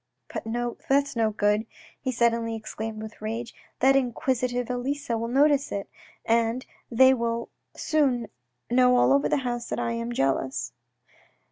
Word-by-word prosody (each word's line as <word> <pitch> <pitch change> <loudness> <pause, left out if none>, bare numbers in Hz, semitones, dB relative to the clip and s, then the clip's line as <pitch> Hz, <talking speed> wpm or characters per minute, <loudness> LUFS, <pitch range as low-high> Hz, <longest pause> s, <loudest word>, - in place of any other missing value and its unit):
" - - -20
But - - -4 0.4
that's 280 0 +2
no 225 -1 +2
good," 210 +1 +1 0.3
he 260 - -1
suddenly 230 -1 +1
exclaimed 220 0 -6
with 220 -1 -10
rage. 230 +2 -4
" - - -39
That 270 +1 +5
inquisitive 245 -1 0
Elisa 250 +1 -2
will 230 +1 -2
notice 280 +3 +3
it, 200 -1 -3 0.4
and 230 +2 +1 0.3
they 260 +3 +6
will 235 -1 -2 0.3
soon 265 -7 +1 0.4
know 250 +1 +4
all 250 - +5
over 280 0 +2
the - - +2
house 240 -1 -3
that - - -2
I 235 - -1
am 230 +1 -3
jealous." 135 - -1
235 Hz, 155 wpm, -26 LUFS, 225-260 Hz, 0.4 s, they